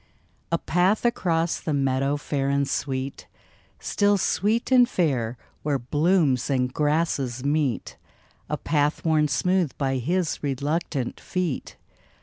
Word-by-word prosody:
A 170 - +3
path 180 +7 +1
across 170 -8 +1
the 155 - -2
meadow 135 +1 +1
fair 140 -1 -2
and 140 0 +1
sweet, 135 0 -3 0.5
Still 205 0 +2
sweet 215 +6 0
and 250 -1 +6
fair 130 - 0 0.2
where 145 -2 0
blooms 145 0 +1
and 125 -2 0
grasses 145 -5 0
meet 145 -4 0 0.5
A 150 - -1
path 150 +1 0
worn 155 -2 +3
smooth 180 0 0
by 135 -2 0
his 170 +6 -1
reluctant 140 -1 -2
feet. 180 -7 -3
150 Hz, 125 wpm, -25 LUFS, 135-170 Hz, 0.5 s, and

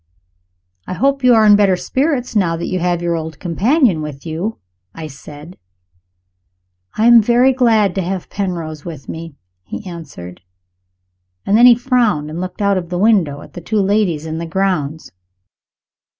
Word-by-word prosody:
"I - - -4
hope 275 +8 0
you 250 -1 +6
are 220 -1 +4
in 205 -1 +7
better 200 -2 +3
spirits, 260 - -2
now 170 -5 +1
that 170 - -4
you 185 - -2
have 175 0 -1
your 170 -1 0
old 160 -2 -6
companion 200 - +1
with 150 -2 -8
you," 170 +7 -4 0.4
I 165 - -7
said. 150 +3 -12 1.4
"I 220 - +2
am 235 -1 +8
very 245 +4 +3
glad 225 -6 +2
to 190 - -2
have 185 0 -4
Penrose 170 -6 -4
with 155 -6 -9
me," 165 -2 -8 0.3
he 145 - -8
answered. 150 - -10 1.0
And 200 - +2
then 240 +3 +7
he 245 - +7
frowned 235 - 0
and 165 +3 -5
looked 185 +3 -5
out 200 -1 +2
of 170 -2 -9
the 180 - -3
window 180 -9 +2
at - - -14
the 175 - -8
two 215 +5 -1
ladies 195 -6 0
in 160 0 -4
the 170 - -5
grounds. 165 -4 -2
185 Hz, 170 wpm, -17 LUFS, 160-220 Hz, 1.4 s, am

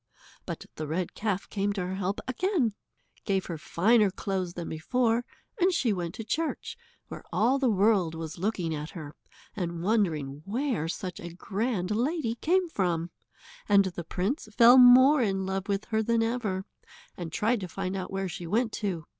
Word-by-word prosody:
But - - -5
the 155 - -4
red 170 +3 -2
calf 205 -3 -2
came 205 0 -1
to 190 -3 -3
her 185 - -4
help 195 +1 -2
again, 265 - 0 0.5
gave 195 -3 0
her 165 -3 -5
finer 210 +6 +3
clothes 185 -2 -3
than 170 -1 -5
before, 230 +8 0 0.4
and 370 +1 +4
she 255 - +1
went 175 -3 -4
to 225 - -6
church, 315 +9 -2 0.3
where - - -9
all 255 +5 +2
the 265 -2 +2
world 195 -5 +2
was 160 +1 -6
looking 180 -4 -1
at 150 +1 -5
her, 150 -2 -8 0.4
and 170 -4 -3
wondering 160 -10 0
where 230 - -1
such 180 +1 -5
a 170 - -7
grand 200 0 -2
lady 245 +2 0
came 355 +9 +1
from, 175 - -1 0.6
and 200 -1 +6
the 175 -2 -4
prince 210 - -2
fell 245 +1 +9
more 260 +3 +8
in 195 -4 0
love 190 0 -3
with 200 0 -1
her 220 0 +2
than 230 +1 +1
ever, 220 -5 -2 0.5
and 170 -3 -6
tried 225 +7 +1
to 185 - -5
find 185 +2 -4
out 185 -1 -4
where 195 0 -2
she 175 -1 -6
went 225 +5 +1
to. 185 -8 -3
195 Hz, 180 wpm, -28 LUFS, 175-230 Hz, 0.6 s, fell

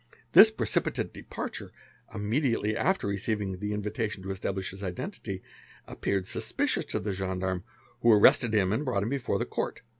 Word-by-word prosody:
'This - - +10
precipitate - - -1
departure, - - -6 0.4
immediately 110 0 0
after 190 0 +1
receivin 100 -1 -2
the 105 +1 -3
invitation 105 -1 -3
to 95 - -4
establish 95 -1 -3
his 95 +1 -10
identity, 95 - -5 0.4
appeared 100 -2 -2
suspicious - - -1
to - - -2
the 105 - -3
gen 95 -1 -3
darme, 95 -1 -1 0.4
who 120 - +6
arrested 110 +2 +6
him 100 -3 +2
and 130 - 0
brought 120 -8 0
him 110 - -2
before 135 -2 -1
the - - -1
Court. 115 - -4
105 Hz, 160 wpm, -28 LUFS, 95-110 Hz, 0.4 s, This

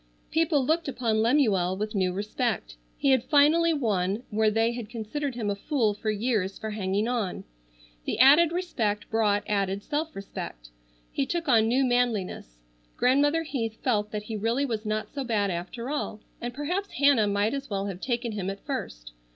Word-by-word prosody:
People 315 -4 +2
looked 325 +3 +1
upon 230 -5 0
Lemuel 215 -8 +2
with 215 +1 -3
new 185 -3 +1
respect. 210 - -2 0.2
He 275 - +2
had 260 -3 +4
finally 315 +3 +4
won 210 - 0
where 215 +1 +3
they 225 +2 +2
had 235 -3 -6
considered 245 +4 -4
him 215 -4 -1
a - - -1
fool 225 -1 0
for 210 +2 -4
years 210 -3 0
for 220 -1 -5
hanging 205 +1 -1
on. 235 -7 -2 0.6
The - - -2
added 290 +7 +7
respect 240 - -1
brought 210 -2 +2
added 200 -1 -1
self 315 +1 -3
respect. - - -7 0.4
He 270 - -1
took 340 +2 -2
on 225 -4 +5
new 255 +4 +3
manliness. 215 - -1 0.3
Grandmother 290 +5 +3
Heath 225 -8 -3
felt 210 -5 +1
that 210 -1 -4
he 220 +1 -5
really 230 +6 0
was 220 -4 -3
not 215 0 -1
so 280 -1 -3
bad 210 -5 0
after 230 +9 -5
all, 255 -7 -3 0.2
and 240 - -3
perhaps 345 +10 -3
Hannah 275 -6 +4
might 205 +3 +1
as 275 -1 -4
well 200 -1 -2
have 195 -2 -5
taken 240 -2 -1
him 195 -3 -3
at 195 0 -7
first. - - -5
225 Hz, 180 wpm, -27 LUFS, 205-275 Hz, 0.6 s, added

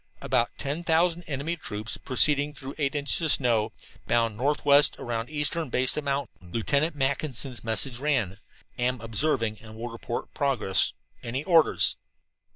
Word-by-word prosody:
"About 120 -2 +1
ten 145 +5 -4
thousand 170 +1 +2
enemy 150 +4 -2
troops 110 -8 -4
proceeding 145 +2 +3
through 135 0 -7
eight 140 -1 0
inches 145 +2 +2
snow, 115 -4 +1 0.4
bound 115 -2 +1
northwest 145 +3 +4
around 115 +1 -4
eastern 150 +1 -1
base 130 +2 +2
of 150 - -3
mountain," 135 -10 -4
Lieutenant 140 - 0
Mackinson's 135 -2 -2
message 120 +2 0
ran. 130 -10 0 0.4
"Am 125 0 0
observing 115 -1 0
and 110 -1 -12
will 120 +2 -6
report 115 0 -6
progress. 130 -9 +1 0.3
Any 130 +5 -4
orders?" 165 -1 +4
135 Hz, 140 wpm, -26 LUFS, 115-150 Hz, 0.4 s, northwest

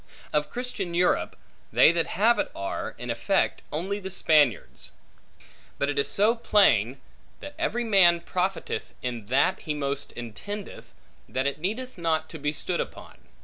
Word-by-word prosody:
Of 150 0 +1
Christian 225 -8 -4
Europe, 180 +1 +2 0.4
they - - +6
that 170 -1 0
have 225 +2 +4
it - - 0
are, 100 0 -4
in - - -4
effect, - - 0
only 190 +6 -2
the 190 -1 -6
Spaniards. 145 - +2 0.9
But 140 - 0
it 145 -1 0
is 140 0 +1
so 210 +3 +4
plain, 140 - +3 0.4
that 290 - -9
every 240 -8 0
man 185 -6 +5
profiteth 185 +2 -3
in 120 -4 -4
that, 130 +4 +2
he 150 - -3
most 140 0 -3
intendeth, 190 - -8 0.3
that 130 +1 -1
it 140 +1 -1
needeth 225 +6 -4
not 160 -1 0
to 160 - -8
be 145 +1 0
stood 170 +4 -2
upon. - - -9
170 Hz, 155 wpm, -26 LUFS, 140-200 Hz, 0.9 s, they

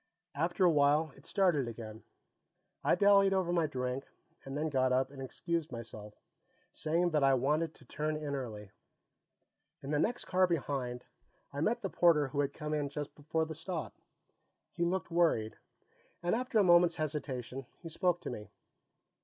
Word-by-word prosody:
After 175 +5 +1
a 175 - +6
while, 150 0 +3
it 140 - -17
started 175 - +2
again. 110 -1 -8 0.8
I - - +4
dallied 200 -1 +5
over 180 -2 +1
my 170 -3 +2
drink, 130 -1 -3 0.4
and 135 +1 -5
then 155 +1 0
got 130 -3 +1
up 130 +1 +1
and 135 -1 -9
excused 165 +4 -3
myself, 110 -3 -8 0.6
saying 170 +3 0
that 150 -3 +2
I 135 -1 +5
wanted 150 +5 0
to 135 - -19
turn 155 +4 -2
in 150 -2 -4
early. 110 -7 -5 1.1
In 140 - -5
the 150 - +2
next 245 +9 0
car 185 0 +3
behind, 135 -7 -2 0.5
I 140 - -3
met 235 +7 +1
the - - 0
porter 150 -5 +4
who 140 - -3
had 140 -1 +1
come 150 +1 -5
in 145 -2 -1
just 145 0 -5
before 155 +2 -1
the 160 - -6
stop. 165 +1 -5 0.8
He 170 - -2
looked 185 0 -1
worried, 165 -11 +2 0.7
and 175 - +1
after 250 0 0
a 210 - +6
moment's 175 -2 +5
hesitation, 135 -4 -4
he 170 - -10
spoke 175 +1 0
to - - -5
me. 105 -3 -7
150 Hz, 170 wpm, -32 LUFS, 135-170 Hz, 1.1 s, a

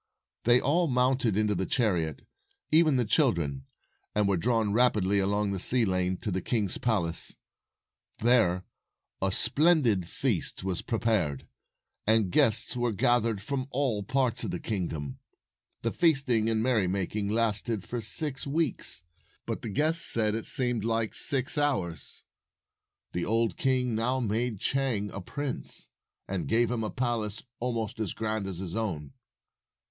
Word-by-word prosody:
They 120 +1 +6
all 165 +7 +1
mounted 125 -5 +1
into 105 -1 +1
the 95 0 -2
chariot 90 - 0 0.2
— - - -42
even 155 -2 +4
the 125 -2 +1
children 85 - +1 0.2
— - - -46
and 105 -1 +2
were 100 - +2
drawn 110 +2 0
rapidly 105 -5 +3
along 100 +1 0
the 95 - -3
sea 120 +5 +3
lane 90 -1 -1
to 105 - -3
the 95 +1 -2
king's 105 -2 -1
palace. 95 -9 0 0.8
There 110 -7 +3 0.6
a 95 0 +1
splendid 120 - +3
feast - - -2
was 95 -2 -2
prepared, 110 - -1 0.6
and 110 -4 +3
guests 110 +6 +5
were 120 -1 0
gathered 115 0 +1
from 130 +2 -3
all 130 -6 -1
parts 125 +2 0
of - - -3
the - - -4
king 95 -6 -3
dom. 75 -4 -6 0.6
The 115 - 0
feasting 135 -10 +2
and 110 -1 0
merrymaking 100 -3 0
lasted 110 -1 +2
for 120 +5 -5
258 - - -4 0.3
six 135 - -5
weeks, 140 - 0 0.4
but - - -4
the 115 - -5
guests 155 +9 +1
said 110 -2 +2
it 110 0 -3
seemed 125 -5 +2
like 115 -1 -1
six 135 +2 0
hours. 95 - -2 0.9
The 85 - -2
old 115 -2 0
king 125 -2 0
now 120 +4 0
made 115 -1 -2
Chang 120 -7 -1
a 100 - -6
prince, 145 +8 -4 0.4
and 95 -2 -3
gave 115 +1 +2
him 115 -2 -2
a 110 - -2
palace 115 -4 -2 0.2
almost 115 -2 -3
as 110 -5 -2
grand 110 -2 -2
as 95 -3 -5
his 90 0 -5
own. 85 -11 -4
110 Hz, 155 wpm, -28 LUFS, 95-125 Hz, 0.9 s, They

